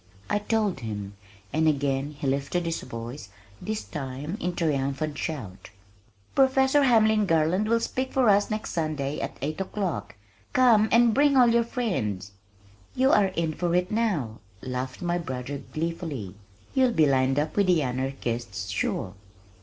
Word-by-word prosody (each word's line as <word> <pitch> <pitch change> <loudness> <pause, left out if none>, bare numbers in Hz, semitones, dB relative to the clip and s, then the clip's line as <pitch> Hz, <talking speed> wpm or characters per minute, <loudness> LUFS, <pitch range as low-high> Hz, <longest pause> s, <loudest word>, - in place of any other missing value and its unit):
I 205 - +2
told 210 -5 0
him, 105 -4 -5 0.4
and 160 +1 +2
again 140 -1 0
he 145 - -5
lifted 140 +6 0
his 165 -1 -2
voice, 115 -1 -7 0.3
this 215 0 -3
time 140 +3 -5
in 180 0 -2
triumphant 145 -2 -1
shout, 120 - -5 0.6
"Professor 265 +1 +4
Hamlin 220 -5 +4
Garland 165 +6 +2
will 230 0 +3
speak 260 +3 -2
for 260 -3 +2
us 205 0 +4
next 215 0 -3
Sunday 150 -3 -2
at - - -5
eight 155 +5 -2
o'clock. 190 - -3 0.4
Come 230 -4 +5
and 235 -1 +5
bring 280 +1 +4
all 245 -2 +7
your 235 0 +4
friends." 125 - -2 0.6
"You 265 +2 +3
are 205 -2 +5
in 170 -4 -2
for 175 +1 -1
it 180 +1 +1
now," 185 - -1 0.2
laughed 130 +4 -4
my 175 0 0
brother 130 -2 -5
gleefully. 155 - -4 0.4
"You'll 260 -2 +3
be 155 - +4
lined 135 -1 +2
up 150 +1 -1
with 200 -2 +3
the 175 -4 +3
anarchists 120 -5 -3
sure!" 95 0 -2
160 Hz, 155 wpm, -26 LUFS, 135-215 Hz, 0.6 s, all